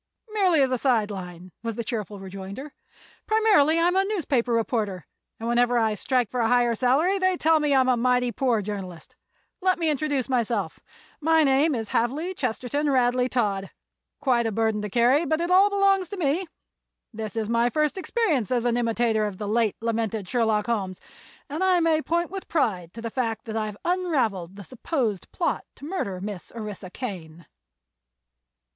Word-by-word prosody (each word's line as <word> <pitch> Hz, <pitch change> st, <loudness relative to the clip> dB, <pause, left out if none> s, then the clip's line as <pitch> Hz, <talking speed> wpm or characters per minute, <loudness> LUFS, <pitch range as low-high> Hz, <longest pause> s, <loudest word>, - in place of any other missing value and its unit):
"Merely 370 Hz, -8 st, +3 dB
as 260 Hz, -, 0 dB
a 255 Hz, -, 0 dB
side 225 Hz, -6 st, +2 dB
line," 180 Hz, -2 st, -8 dB
was 230 Hz, -2 st, -4 dB
the 235 Hz, -, -3 dB
cheerful 210 Hz, -3 st, -4 dB
rejoinder. 195 Hz, +8 st, -8 dB, 0.5 s
"Primarily 415 Hz, -9 st, +4 dB
I'm 350 Hz, +2 st, +2 dB
a 385 Hz, -, +4 dB
newspaper 300 Hz, -, 0 dB
reporter, 220 Hz, -6 st, -1 dB, 0.3 s
and 225 Hz, -, -4 dB
whenever 240 Hz, +1 st, +2 dB
I 220 Hz, -2 st, +2 dB
strike 245 Hz, +1 st, 0 dB
for 250 Hz, -, -2 dB
a 230 Hz, -, +2 dB
higher 240 Hz, 0 st, +3 dB
salary 280 Hz, -, +2 dB
they 370 Hz, -1 st, +2 dB
tell 320 Hz, 0 st, +3 dB
me 295 Hz, -2 st, +2 dB
I'm 260 Hz, -1 st, +4 dB
a 255 Hz, -, +4 dB
mighty 250 Hz, 0 st, +2 dB
poor 235 Hz, -2 st, 0 dB
journalist. 185 Hz, -5 st, -7 dB, 0.5 s
Let 370 Hz, 0 st, +2 dB
me 325 Hz, -2 st, +1 dB
introduce 285 Hz, -3 st, -1 dB
myself. 230 Hz, -8 st, -1 dB, 0.4 s
My 320 Hz, 0 st, +4 dB
name 280 Hz, +2 st, +3 dB
is 225 Hz, -3 st, -4 dB
Havely 295 Hz, +10 st, 0 dB
Chesterton 255 Hz, +3 st, -1 dB
Radley 250 Hz, -1 st, +2 dB
Todd, 200 Hz, -6 st, -1 dB, 0.5 s
quite 245 Hz, -5 st, +2 dB
a -, -, -1 dB
burden 220 Hz, 0 st, 0 dB
to 210 Hz, -, -4 dB
carry 245 Hz, -, +3 dB
but 315 Hz, 0 st, 0 dB
it 345 Hz, +1 st, -1 dB
all 385 Hz, +3 st, +6 dB
belongs 395 Hz, -3 st, +2 dB
to 405 Hz, -, -6 dB
me. 340 Hz, +2 st, 0 dB, 0.7 s
This 215 Hz, -2 st, -5 dB
is 220 Hz, -2 st, -1 dB
my 235 Hz, +1 st, +2 dB
first 300 Hz, +3 st, 0 dB
experience 375 Hz, -, 0 dB
as 245 Hz, -2 st, 0 dB
an 240 Hz, 0 st, +2 dB
imitator 230 Hz, -2 st, +1 dB
of 200 Hz, -3 st, -7 dB
the 210 Hz, -, -5 dB
late 220 Hz, -1 st, +1 dB
lamented 225 Hz, -3 st, -2 dB
Sherlock 220 Hz, -2 st, +1 dB
Holmes, 195 Hz, -6 st, -2 dB, 0.5 s
and 305 Hz, +6 st, -3 dB
I 370 Hz, -1 st, +4 dB
may 325 Hz, -2 st, +2 dB
point 340 Hz, +2 st, -1 dB
with 390 Hz, -1 st, -6 dB
pride 185 Hz, -, 0 dB
to 230 Hz, -, -8 dB
the 230 Hz, -, -4 dB
fact 230 Hz, -3 st, -2 dB
that 220 Hz, -1 st, -5 dB
I've 215 Hz, -2 st, -3 dB
unraveled 260 Hz, -, 0 dB
the 200 Hz, -, -9 dB
supposed 240 Hz, -, -3 dB
plot 345 Hz, -, -1 dB
to -, -, -11 dB
murder 290 Hz, -, -3 dB
Miss 200 Hz, -1 st, -6 dB
Orissa 210 Hz, -4 st, -6 dB
Kane." 170 Hz, -, -7 dB
245 Hz, 180 wpm, -25 LUFS, 215-310 Hz, 0.7 s, all